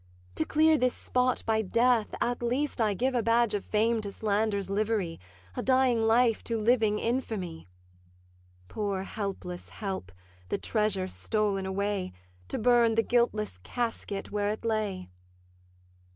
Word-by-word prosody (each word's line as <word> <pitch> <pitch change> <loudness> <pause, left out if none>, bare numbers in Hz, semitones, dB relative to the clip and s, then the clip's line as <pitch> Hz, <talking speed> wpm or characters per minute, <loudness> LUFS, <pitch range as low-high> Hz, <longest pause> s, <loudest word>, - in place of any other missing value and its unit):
To 155 - -1
clear 310 - +4
this 250 0 +2
spot 250 0 0
by 220 -1 +2
death, 230 +2 +2
at 240 +1 -1
least 250 +2 -1
I 210 -2 +2
give 260 +5 0
A 245 - +2
badge 230 0 +3
of 205 - -1
fame 225 +1 +1
to 200 -1 -5
slander's 205 -2 0
livery; 205 -3 -1 0.4
A - - -2
dying 255 -3 +3
life 230 0 +3
to 230 - -1
living 220 -1 +2
infamy: 210 - -3 1.0
Poor 200 - -2
helpless 195 -3 -5
help, 190 - -5 0.4
the - - 0
treasure 210 -4 0
stol'n 200 -1 -1
away, 195 -1 -2 0.3
To - - -3
burn 235 -1 +4
the 225 - +3
guiltless 220 - 0
casket 210 - -4
where 205 0 0
it 215 +2 -4
lay! 210 - -2
215 Hz, 140 wpm, -29 LUFS, 200-235 Hz, 1.0 s, clear